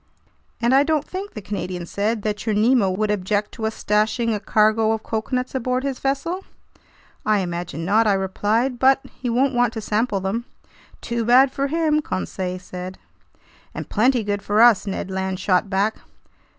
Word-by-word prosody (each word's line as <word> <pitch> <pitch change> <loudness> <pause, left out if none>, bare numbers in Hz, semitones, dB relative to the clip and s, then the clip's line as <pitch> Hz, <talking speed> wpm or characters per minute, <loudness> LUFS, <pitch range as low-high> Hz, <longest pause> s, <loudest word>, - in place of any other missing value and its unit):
"And 235 +2 +2
I 270 - +6
don't 305 0 +1
think," 390 +2 -7
the 215 - -7
Canadian 180 -2 -4
said, 210 +4 -2
"that 210 -1 -2
your 215 - +1
Nemo 220 -1 +3
would 210 +3 0
object 205 +1 -1
to 220 -1 -3
us 220 - -4
stashing 220 +2 +1
a 210 - -1
cargo 215 +2 +3
of 220 - -4
coconuts 250 +3 -2
aboard 255 0 -1
his 275 -2 -3
vessel?" 280 +8 -2 0.8
"I 215 -2 +2
imagine 170 -3 -4
not," 215 +4 +3
I 205 - +4
replied, 210 +6 0
"but 265 +1 +4 0.2
he 250 - -2
won't 260 +4 +2
want 245 -1 +2
to 225 - -4
sample 210 0 0
them." 200 +5 -2 0.6
"Too 235 -1 -2
bad 255 +4 +5
for 275 +1 -1
him!" 310 0 +1
Conseil 185 - -3
said. 185 0 -8 0.8
"And - - -6
plenty 240 +2 +2
good 205 -1 -2
for 205 +2 0
us!" 230 -3 +6
Ned 190 -1 -4
Land 190 0 -2
shot 185 0 +1
back. 200 +3 0
220 Hz, 175 wpm, -22 LUFS, 200-250 Hz, 0.8 s, I